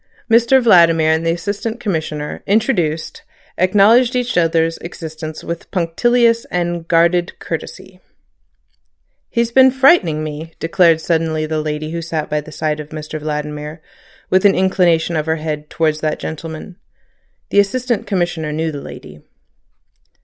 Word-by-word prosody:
Mr 235 +3 +5
Vladimir 165 -8 +5
and 160 +1 +1
the - - +3
Assistant 205 +6 -4
Commissioner, 155 -8 -4
introduced, 195 - 0 0.4
acknowledged 215 +7 +4
each 250 0 -1
other's 165 -1 +1
existence 160 -2 -8
with 170 0 -6
punctilious 230 +7 +2
and 175 -1 -3
guarded 170 +1 +2
courtesy. 475 - -7 1.3
"He's 235 -1 0
been 260 +2 +6
frightening 260 - +3
me," 155 +2 -7
declared 165 -1 +3
suddenly 160 -2 0
the 155 0 -2
lady 155 0 -4
who 170 0 -4
sat 160 -2 -4
by 150 0 0
the 155 - -13
side 155 0 -2
of 150 0 -8
Mr 155 0 -6
Vladimir, 150 +1 -5 0.5
with 185 0 +3
an 200 -1 +5
inclination 175 -3 +2
of 155 0 -2
the 160 - +1
head 150 -1 -5
towards 155 -2 0
that 155 0 -1
gentleman. 160 +3 -7 0.7
The 200 - +4
Assistant 235 +3 0
Commissioner 175 -5 -1
knew 160 +1 -2
the 145 -2 -7
lady. 75 - -11
165 Hz, 140 wpm, -17 LUFS, 155-200 Hz, 1.3 s, been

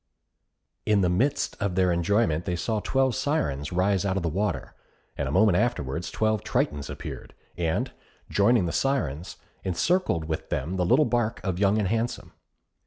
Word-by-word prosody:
In 105 -2 +3
the 90 - +3
midst 130 +11 +1
of 100 -3 -1
their 90 -1 +3
enjoyment 85 -1 +1
they 90 - -1
saw 110 +5 -1
twelve 130 +3 +1
Syrens 80 - -1
rise 95 +1 +2
out 95 -1 0
of 95 - -2
the 85 - 0
water, 90 -5 -2 0.4
and 70 - -2
a - - -2
moment 100 +2 +4
afterwards 85 - -1
twelve 110 -2 0
Tritons 75 -1 -1
appeared, - - -8 0.2
and 80 -1 -1 0.4
joining 105 0 +3
the 85 - -1
Syrens, 95 - -1 0.3
encircled 95 - +1
with 80 0 -4
them 80 +8 -2
the 90 - +1
little 135 +8 +5
barque 120 -3 0
of 95 -2 -2
Young 100 +1 +3
and 105 -3 +1
Handsome. 115 +4 -2
95 Hz, 170 wpm, -26 LUFS, 85-115 Hz, 0.4 s, little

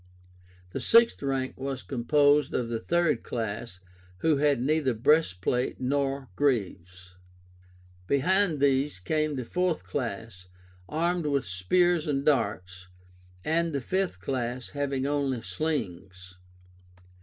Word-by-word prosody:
The - - -4
sixth 230 0 +4
rank 135 -2 -2
was 135 -1 -4
composed 145 +3 +2
of 120 -2 -1
the 115 -1 -2
third 170 -1 +1
class, 110 -3 -5 0.4
who 155 -3 +3
had 145 -2 +2
neither 135 -1 +1
breastplate 125 - +1
nor 135 +1 -1
greaves. 90 -8 -2 0.9
Behind 165 - +2
these 140 -2 +2
came 155 +10 -1
the 130 -3 -4
fourth 180 +3 -1
class, 115 -7 -5 0.4
armed 170 +1 0
with 140 -2 0
spears 155 - +1
and 140 -1 -1
darts, 90 -10 0 0.6
and 165 0 +1
the 140 - 0
fifth 185 - -1
class, 125 +3 -3
having 140 -2 -2
only 140 -4 -1
slings. 95 - -4
135 Hz, 115 wpm, -27 LUFS, 115-150 Hz, 0.9 s, sixth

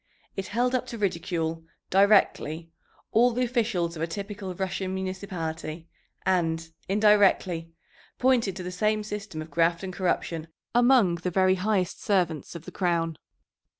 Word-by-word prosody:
It 195 - -4
held 245 +3 0
up 255 - 0
to 235 - -6
ridicule, 165 -4 -2 0.3
directly, 185 -5 +3 0.4
all 240 +3 +5
the 245 +1 0
officials 220 -9 0
of 160 - -6
a 165 - 0
typical 195 +1 -6
Russian 190 0 -2
municipality, 170 -4 -5 0.4
and, 165 -3 +1 0.2
indirectly, 195 -5 +3 0.5
pointed 245 -7 +2
to 185 - -6
the 180 - -5
same 215 +3 +1
system 205 -6 -5
of 155 - -15
graft 170 +3 +2
and 185 -1 -5
corruption 170 -3 -1 0.3
among 240 -7 +5
the 175 +2 -2
very 185 +1 +3
highest 190 -1 0
servants 175 -6 0
of 165 -1 -8
the - - -8
crown. 170 -3 0
185 Hz, 145 wpm, -27 LUFS, 165-210 Hz, 0.5 s, all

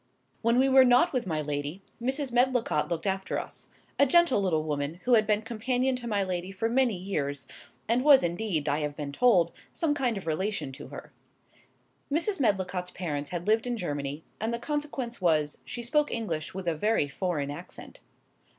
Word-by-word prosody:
When 235 +1 +3
we 265 +1 +5
were 265 0 +7
not 250 +7 +4
with 250 -6 -1
my 155 -3 -1
lady, 145 +5 -4 0.2
Mrs. 265 +2 -1
Medlicott 245 -10 +2
looked 170 -2 -3
after 190 -1 -1
us; - - -8 0.3
a 280 - +6
gentle 340 -6 +4
little 165 -5 +1
woman, 145 0 -2
who 250 - +2
had 215 -2 +5
been 210 0 +2
companion 250 +3 0
to 240 -1 -6
my 205 -3 +1
lady 185 0 -3
for 210 +4 -1
many 240 -3 +2
years, 145 -7 -3 0.4
and 240 +3 +2
was 285 -2 +7
indeed, 175 -3 -1
I 145 +1 +1
have 150 -1 -3
been 145 -2 -5
told, 180 -2 +4 0.2
some 320 -3 0
kind 250 -6 0
of 195 - -7
relation 160 -2 -2
to 140 +2 -10
her. - - -10 1.0
Mrs. 345 +6 +1
Medlicott's 190 -6 0
parents 150 -6 -4
had 175 -1 -4
lived 220 +3 +2
in 240 -1 -1
Germany, 145 -4 -4 0.2
and 220 +2 -1
the 235 - -1
consequence 270 -4 -3
was, 155 -4 +1
she 240 - -6
spoke 295 +5 +1
English 170 -10 -3
with 190 -2 -5
a 170 - +2
very 185 -1 +1
foreign 145 -2 -2
accent. 170 +5 -10
200 Hz, 185 wpm, -28 LUFS, 155-245 Hz, 1.0 s, were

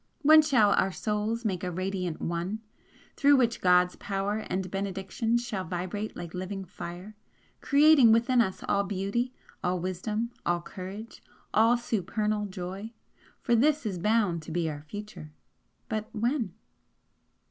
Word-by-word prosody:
When 310 +2 +8
shall 245 -9 +4
our 195 - +2
Souls 215 +4 -2
make 190 -4 -1
a 180 - -1
radiant 185 -1 -3
ONE, 175 +5 -2 0.6
through 285 0 +5
which 240 -3 +2
God's 180 0 +4
power 200 +2 -2
and 185 -1 -2
benediction 195 +4 -1
shall 235 -6 -3
vibrate 185 +4 -4
like 170 -1 -7
living 190 +1 -5
fire, 180 +3 -8 0.5
creating 285 -4 +6
within 235 +2 +4
us 190 -5 -2
all 200 0 +2
beauty, 200 +6 -2 0.3
all 180 0 0
wisdom, 210 +6 -2
all 175 0 +1
courage, 195 +6 -8 0.3
all 230 +3 +5
supernal 215 -2 -1
joy? 190 +4 -6 0.5
For 240 - +1
this 295 +3 +3
is 190 -5 -2
bound 205 -4 +2
to 160 - -9
be 170 0 0
our 145 -1 -7
future 155 -2 -9 0.5
but 215 0 -3
when?" 230 - -1
205 Hz, 140 wpm, -28 LUFS, 180-230 Hz, 0.6 s, When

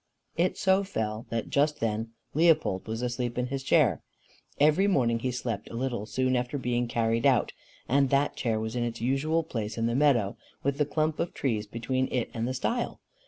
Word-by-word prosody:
It 175 +2 +1
so 190 +1 +3
fell 110 - -3
that 115 -1 -3
just 150 +1 +2
then 115 0 -2 0.2
Leopold 155 - +3
was 115 +2 -3
asleep 120 -1 -2
in 125 - +1
his 135 0 -3
chair, 135 - +3 0.6
every 155 +7 +4
morning 120 -11 +2
he 130 - -1
slept 120 -3 -4
a - - -8
little 120 -4 -2
soon 130 +4 +1
after 125 +3 -1
being 120 -2 0
carried 115 0 0
out, 130 -5 +2 0.3
and 140 +1 +3
that 140 +2 +2
chair 115 -3 0
was 110 +1 -4
in 120 - 0
its 120 -1 -3
usual 140 +7 +1
place 115 -8 -4
in 115 - 0
the 115 - +1
meadow, 125 -7 +3 0.3
with 140 +1 0
the 150 - +2
clump 155 0 0
of 170 - -2
trees 110 -6 -1
between 130 +4 -2
it 125 -2 -1
and 115 0 -2
the 130 - -2
stile. 235 - -2
125 Hz, 200 wpm, -28 LUFS, 115-145 Hz, 0.6 s, every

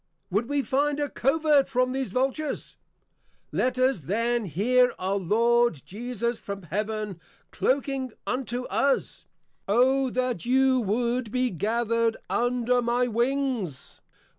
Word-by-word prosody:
Would 215 +7 0
we 285 -1 +1
find 290 +2 0
a 290 -1 -1
Covert 290 +1 +2
from 255 -1 +1
these 265 0 -2
Vultures? 270 +4 -2 0.8
Let 255 0 0
us 255 -4 +2
then 230 - 0
Hear 245 - +2
our 190 +2 -1
Lord 230 - +2
Jesus 235 +2 -3
from 200 -1 -7
Heaven 210 0 -3 0.3
Clocquing 270 -1 0
unto 250 -1 -2
us, 275 +2 -1 0.4
_O 260 +4 +3
that 250 -6 -1
you 260 +1 +3
would 235 +2 -1
be 250 0 0
gathered 230 +4 0
under 245 0 +1
my 240 +1 +1
wings! 240 - -2
245 Hz, 120 wpm, -26 LUFS, 220-260 Hz, 0.8 s, O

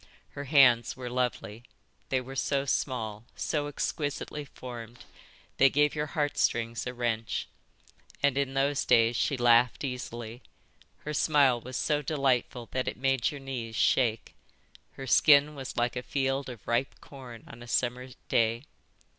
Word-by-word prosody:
Her 140 - -7
hands 130 -5 +4
were 125 -1 -6
lovely. 120 -3 -2 0.5
They 130 -1 +1
were 135 +2 -9
so 140 0 0
small, 115 -6 -2
so 145 -2 -2
exquisitely 145 0 -3
formed, 120 -3 -10 0.5
they 135 - +6
gave 145 +2 +2
your 150 0 -2
heart 145 -1 0
strings 115 +1 0
a 125 - -4
wrench. 115 -2 -2 0.8
And 140 -2 +3
in 135 -1 -1
those 140 +1 +1
days 115 -1 +4
she 140 +3 0
laughed 120 +1 +4
easily. 120 -2 -6 0.6
Her 150 - -5
smile 140 -6 +3
was 130 -1 -6
so 150 +5 0
delightful 130 -5 0
that 130 0 -2
it - - -3
made 135 0 +1
your 145 -3 -8
knees 120 -4 -5
shake. 115 -1 +1 0.6
Her 135 - -8
skin 145 +3 +5
was 135 -3 -7
like 120 +1 0
a 125 - -2
field 135 +1 -1
of 120 -5 -11
ripe 120 +3 0
corn 125 -5 -11
on 120 - -12
a 120 - -10
summer 125 +1 -1 0.2
day. 115 +2 +1
130 Hz, 155 wpm, -29 LUFS, 120-140 Hz, 0.8 s, they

